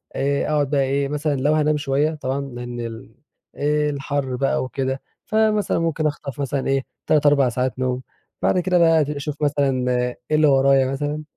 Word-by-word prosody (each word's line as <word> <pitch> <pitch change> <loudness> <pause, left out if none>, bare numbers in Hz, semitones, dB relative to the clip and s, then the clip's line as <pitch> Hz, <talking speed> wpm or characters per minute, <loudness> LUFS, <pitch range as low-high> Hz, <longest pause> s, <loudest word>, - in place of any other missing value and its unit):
آآ، 140 +1 0
أَقعد 145 -2 +1
بقى 140 -1 +2
إيه 140 +1 0
مثلًا 150 +1 -1
لو 145 +3 +1
هانام 155 -1 +2
شويّة 145 +2 0
طبعًا 135 -1 -3
لأن 120 -3 -7
ال 115 -1 -7 0.7
الحَر 140 -2 -2
بقى 135 +1 0
وكده، 130 +1 -3 0.2
فمثلًا 215 -3 +1
ممكن 165 -2 0
أخطف 145 -2 -5
مثلًا 140 -1 -2
إيه 135 -1 +1 0.2
3 150 -1 +3
4 140 -3 +4
ساعات 130 +1 -2
نوم، 130 0 -1 0.4
بعد 180 - +2
كده 180 0 +1
بقى 165 -1 +5
أبتدي 150 0 -2
أشوف 145 +1 -5
مثلًا 140 -3 +1 0.4
إيه 155 - +2
اللي 155 0 +4
ورايا 135 -1 +4
مثلًا. 145 +2 -3
140 Hz, 175 wpm, -22 LUFS, 135-150 Hz, 0.7 s, بقى